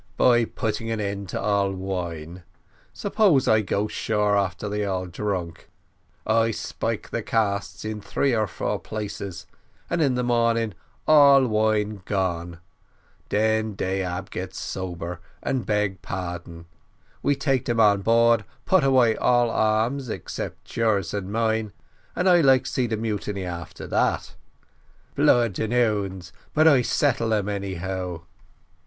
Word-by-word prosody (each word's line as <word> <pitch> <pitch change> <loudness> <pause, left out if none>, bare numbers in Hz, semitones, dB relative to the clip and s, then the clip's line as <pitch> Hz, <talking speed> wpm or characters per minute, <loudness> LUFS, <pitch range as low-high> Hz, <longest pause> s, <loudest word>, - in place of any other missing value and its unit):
"By 120 -2 +4
putting 110 0 -3
an 110 -1 -2
end 100 -2 -3
to - - -3
all 100 -1 +1
wine. 90 -3 -5 0.5
Suppose 200 - +2
I 110 0 +5
go 105 +1 -1
shore 105 -1 0
after 100 0 -1
they 105 0 -2
all 95 -2 -2
drunk, 90 -2 -4 0.6
I 115 +1 +3
spile 110 - -3
the - - -2
casks 100 -3 -1
in 110 -1 -4
three 130 +5 0
or 110 -1 +1
four 85 - -3
places, 100 -4 -6 0.5
and 170 -1 +1
in 135 -4 +2
the 125 - 0
morning 115 -2 +1 0.3
all 140 -3 +7
wine 110 -2 0
gone 85 -4 -2 0.7
den 110 +1 +1
dey 95 0 -1
ab 90 +1 -4
get 95 +1 -5
sober, 90 -2 -5 0.2
and 130 -3 -1
beg 105 -2 0
pardon 85 -2 -6 0.6
we 145 - +2
take 135 -2 0
dem 120 -1 0
on 105 -3 +5
board, 115 +1 +4 0.2
put 190 -5 +4
away 130 -4 +4
all 120 -1 +2
arms 115 +5 +1 0.2
'cept - - -7
yours 105 -7 +1
and 100 -1 -4
mine, 110 -2 0 0.4
and 180 - 0
I 175 -2 +6
like 135 -3 +5
to - - -5
see 125 -2 0
the 110 -1 -2
mutiny 105 -3 -3
after 85 -2 -7
dat. - - 0 0.8
Blood 115 -6 +3
and 110 0 -1
'ounds 100 -7 0 0.2
but 155 +1 +5
I 140 -5 +6
settle 115 -3 +1
um, 105 -2 -1
anyhow." 95 -3 -4
105 Hz, 145 wpm, -24 LUFS, 95-115 Hz, 0.8 s, all